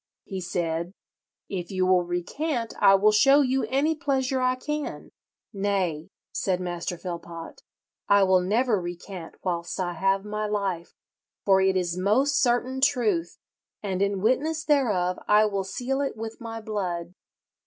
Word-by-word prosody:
He 190 -2 -5
said, 170 0 -2 0.5
'If 180 -3 -5
you 185 -1 0
will 185 -1 +4
recant 230 - -2
I 195 - +7
will 210 +2 +4
show 275 +7 +6
you 265 -1 +1
any 285 +4 +1
pleasure 270 -4 0
I 255 0 +2
can.' 300 +3 -5 0.4
'Nay,' 195 -6 -1 0.2
said 185 -2 0
Master 175 -1 -4
Philpot, 170 -1 -7 0.5
'I 200 0 +6
will 185 -1 +4
never 215 +2 +1
recant 175 0 -7
whilst 170 -1 -3
I 175 -1 -1
have 195 +3 +1
my 210 0 -2
life, 195 -5 -2 0.5
for 190 -1 +5
it 190 0 +3
is 180 -1 -1
most 265 +9 +2
certain 255 +1 +1
truth, 220 -12 +1 0.5
and 190 -2 -2
in 200 -1 0
witness 300 +8 +1
thereof 210 - +2
I 210 +1 +5
will 200 -2 -1
seal 260 +7 -2
it 275 -5 -2
with 225 +1 -7
my 225 -1 -6
blood.' 180 -5 -3
200 Hz, 150 wpm, -26 LUFS, 180-250 Hz, 0.5 s, I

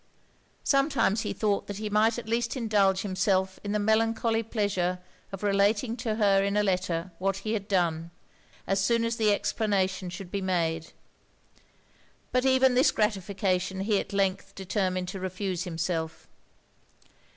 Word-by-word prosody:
Sometimes 275 -7 +2
he - - -3
thought 205 -2 -1
that 205 - -5
he 215 0 -4
might 215 +2 +2
at 240 - -6
least 230 +3 -1
indulge 200 -5 +2
himself 190 -1 0
in 205 - -3
the 210 - +1
melancholy 225 +2 +1
pleasure 200 -5 -1 0.3
of 195 +1 -7
relating 205 +3 +2
to 225 -3 -2
her 200 -3 +3
in 200 +1 0
a 210 - +3
letter, 185 -2 -1
what 195 +1 0
he 215 - 0
had 205 -2 -3
done, 170 -4 0 0.6
as 195 +1 +1
soon 230 +3 +2
as 230 0 -1
the 215 -3 +3
explanation 195 -3 0
should 180 0 -8
be 200 - -2
made: 165 -3 -1 1.4
but 255 +1 +1
even 260 -1 +4
this 255 +2 +5
gratification 190 -3 -1
he 205 0 +1
at - - -6
length 195 0 -1
determined 185 -1 -1
to 190 - -5
refuse 185 -1 -3
himself. 165 -1 -3
200 Hz, 150 wpm, -28 LUFS, 185-220 Hz, 1.4 s, this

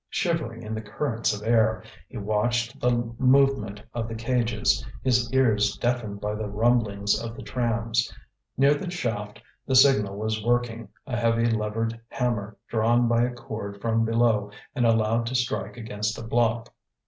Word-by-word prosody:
Shivering 155 - -2
in 110 0 -5
the 110 - -3
currents 115 +2 -1
of 105 0 -5
air, 110 -1 +3 0.3
he 130 - -8
watched 115 +3 -1
the 120 -1 +1
movement 130 -6 +3
of 115 -2 -3
the 115 - -5
cages, 115 0 +1 0.2
his 125 -2 +2
ears 110 -6 +2
deafened 120 -4 -1
by 105 +1 -2
the 105 0 -3
rumblings 105 -2 +1
of 115 0 -6
the - - -9
trams. 115 -1 -1 0.5
Near 140 +2 +5
the 175 +5 -4
shaft 110 -11 -3 0.3
the 130 - +1
signal 105 -7 +5
was 110 0 -2
working, 120 -1 0 0.2
a 130 -3 -3
heavy 115 0 +2
levered 115 0 -1
hammer 110 -6 -2
drawn 115 +2 +2
by 115 0 +3
a 125 - -2
cord 110 -4 -7
from 115 +1 +1
below 115 -2 +2 0.2
and 125 -4 +2
allowed 115 +1 +2
to 130 - -3
strike 110 -4 -1
against 105 -1 -3
a - - -6
block. 115 0 0
115 Hz, 160 wpm, -26 LUFS, 110-120 Hz, 0.5 s, Near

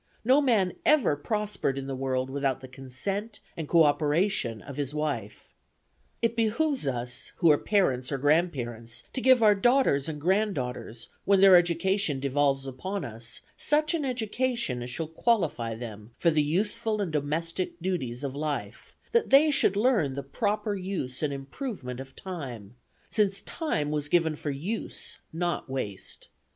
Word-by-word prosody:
No 265 +4 +5
man 215 -10 +2
ever 300 - +4
prospered 205 -3 -1
in 135 - -4
the 135 -1 -4
world 130 0 -1
without 135 -2 0
the 130 - -9
consent 165 - -5 0.2
and 160 -3 -5
coöperation 150 - +2
of 140 - -7
his 145 0 -3
wife. 120 -9 -4 0.7
It 230 0 +2
behoves 235 - +1
us, 125 +1 -2
who 170 -3 +5
are 145 - +5
parents 135 -12 +1
or 140 - 0
grandparents, 125 -6 0
to 260 - -2
give 260 -2 +5
our 210 -1 +7
daughters 205 - +3
and 150 -2 -5
granddaughters, 145 - -1
when 200 -1 +4
their 195 -1 +8
education 175 -2 +2
devolves 140 0 +1
upon 185 +10 -4
us, 115 0 -4
such 305 +2 +2
an 325 -3 0
education 240 - -1
as 120 - -5
shall 160 +6 -3
qualify 160 - 0
them 110 -1 -9
for 170 - +3
the 155 -1 +3
useful 210 +8 0
and 195 -5 -1
domestic 165 +5 -2
duties 145 -9 -3
of 135 -2 -3
life, 150 -1 -4 0.2
that 470 0 +2
they 295 +3 +6
should 200 -8 +3
learn 205 - +2
the 140 - -4
proper 205 - -1
use 185 -10 -3
and 150 -2 0
improvement 135 - -6
of 135 0 -9
time, 125 - -7 0.4
since 200 -2 +1
'time 150 - -2
was 150 -1 -1
given 160 -1 +2
for 150 - -5
use, 170 +11 -4
not 175 -3 -2
waste.' 105 -8 -4
155 Hz, 155 wpm, -28 LUFS, 135-205 Hz, 0.7 s, their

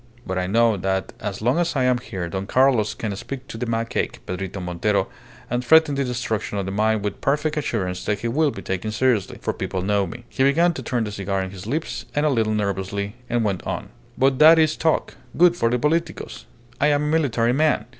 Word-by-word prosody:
But 95 0 -2
I 90 - -1
know 115 +1 +3
that 95 +1 -2
as 105 0 -5
long 125 +8 +2
as 175 -2 0
I 130 - +2
am 125 -1 +3
here 95 -8 -5
Don 95 +3 -4
Carlos 125 -5 +3
can 105 -3 -3
speak 130 +6 -7
to - - -6
that 125 -1 -3
macaque, 115 0 -1
Pedrito 95 +1 -4
Montero, 90 -1 0 0.4
and 120 +1 -1
threaten 160 +3 +5
the 140 0 0
destruction 120 -5 -2
of 100 - -2
the 95 - -3
mine 110 +1 +1
with 105 -1 -4
perfect 150 +2 0
assurance 95 -11 -2
that 105 -1 -1
he 120 - -1
will 150 +6 +2
be - - -7
taken 95 +3 -3
seriously. 110 -4 +1
For - - -1
people 95 - -3
know 100 0 +1
me." 120 +7 -9
He - - -4
began 165 +6 +4
to 135 - -6
turn 120 -2 -1
the 105 - -4
cigar 100 -1 -2
in 95 - -6
his 95 +1 -9
lips 155 +7 -3
a 145 +1 +2
little 110 -6 +1
nervously, 100 0 -2 0.2
and 120 -1 +1
went 100 -4 -1
on - - -4 0.3
"But 135 0 +2
that 160 +2 +9
is 155 -1 +3
talk 160 -1 0 0.2
good 175 0 +6
for 115 -9 +1
the 125 - +1
politicos. 150 - -2 0.3
I 140 - +4
am 145 0 +2
a - - -1
military 135 -7 +1
man. 155 +3 +2
115 Hz, 225 wpm, -23 LUFS, 100-140 Hz, 0.4 s, that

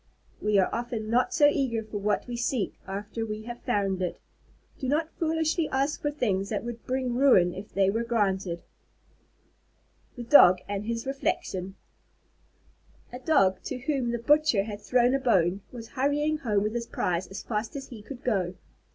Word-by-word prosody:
We 210 -1 +2
are 190 - +2
often 230 -2 -3
not 245 +2 +2
so 295 - +4
eager 260 -6 0
for 215 -1 -5
what 205 +1 0
we 245 - -5
seek, 235 -4 -1
after 205 +3 -4
we 215 -1 -5
have 240 +1 -8
found 195 -5 0
it. 180 - -2 0.6
Do 265 - -3
not 310 +3 0
foolishly 320 0 0
ask 275 +3 0
for 295 - 0
things 200 -9 -1
that 210 - -2
would 235 -1 -7
bring 255 -1 -1
ruin 240 -9 +5
if 200 +3 -9
they 195 0 +2
were 225 +3 -1
granted. 195 -7 -1 1.5
THE 245 - -6
DOG 185 -8 +7
AND 205 0 -3
HIS 230 0 -3
REFLECTION 195 -8 -2 1.4
A 250 - -6
Dog, 200 -10 +3
to - - -3
whom 265 -1 -1
the 235 - -1
butcher 290 -3 +3
had 205 -1 -7
thrown 245 +3 +3
a 275 - +2
bone, 195 -7 +2
was 230 -2 -9
hurrying 295 +3 0
home 210 -6 +1
with 215 +1 -1
his 235 -1 -3
prize 180 0 -1
as 195 - -7
fast 220 +1 -3
as 275 -1 -6
he 230 -4 -9
could 255 +5 -10
go. 190 -7 0
230 Hz, 175 wpm, -27 LUFS, 200-265 Hz, 1.5 s, DOG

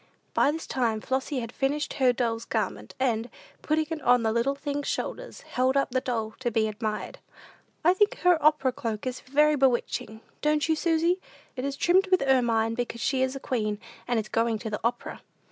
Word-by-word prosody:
By - - +4
this 320 +2 -3
time 230 -4 0
Flossy 265 +3 -2
had 230 0 -6
finished 285 +3 -1
her 255 -1 +6
doll's 230 -2 -1
garment, 190 - -3
and, 240 -2 0 0.3
putting 310 +1 +1
it 320 -1 -3
on 245 -1 +4
the 220 - +2
little 235 +5 +1
thing's 285 0 -3
shoulders, - - -4
held 260 +2 0
up 275 - +1
the 255 0 +1
doll 225 -4 -2
to 255 -2 0
be 220 -1 +1
admired. 215 0 -4 0.7
"I 350 - +7
think 410 +2 +2
her 355 -4 +4
opera 300 -4 +4
cloak 225 -2 -4
is 255 0 -3
very 300 +3 +3
'bewitching,' 240 -4 0 0.2
don't 300 0 +2
you, 320 - +3
Susy? 335 +3 +1 0.3
It 255 0 -3
is 280 0 -2
trimmed 375 +3 +3
with 370 -5 +3
ermine, 235 -4 +2
because 235 0 -3
she 265 +2 0
is 260 +1 0
a - - -4
queen, 215 -6 -2 0.3
and 240 -2 +1
is 215 - -4
going 230 0 +1
to 220 0 -6
the 210 - -2
opera." 240 +1 -2
255 Hz, 195 wpm, -27 LUFS, 230-295 Hz, 0.7 s, I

